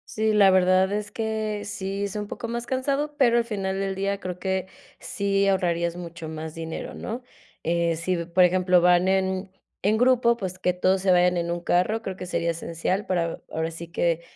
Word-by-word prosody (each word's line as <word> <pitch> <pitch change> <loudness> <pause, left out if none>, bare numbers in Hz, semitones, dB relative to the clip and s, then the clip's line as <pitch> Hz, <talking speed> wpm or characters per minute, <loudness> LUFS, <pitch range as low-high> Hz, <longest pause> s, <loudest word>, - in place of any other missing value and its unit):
Sí, 220 0 +2
la 205 -2 +6
verdad 185 0 +4
es 210 0 -3
que 220 -2 -2
sí 195 -1 -4
es 200 0 -3
un 210 0 -3
poco 230 - -6
más 235 +1 -4
cansado, 275 +4 -1
pero 240 -4 +4
al 235 - +2
final 195 -4 -3
del 195 0 -1
día 200 +1 -1
creo 180 -2 -6
que 190 -1 -1 0.3
sí 200 0 0
ahorrarías 170 -3 +1
mucho 170 -2 -8
más 160 0 -6
dinero, 165 0 -6
¿no? 235 +3 -5 0.4
Eh, 170 0 +1
sí, 175 +3 -1
por 175 +2 +3
ejemplo, 180 0 +4
van 180 +1 +4
en 190 0 0 0.3
en 210 +3 +3
grupo, 245 -1 +4
pues 185 -4 -5
que 180 0 +1
todos 185 +1 +1
se 190 0 +3
vayan 180 0 +4
en 170 0 -1
un 175 - -3
carro, 185 +6 +1
creo 190 -4 -5
que 185 - -7
sería 170 -1 -1
esencial 170 +4 -2
para, 170 -3 -1
ahora 160 +1 -1
sí 165 +1 -8
que 170 -1 +1
190 Hz, 200 wpm, -25 LUFS, 175-210 Hz, 0.4 s, la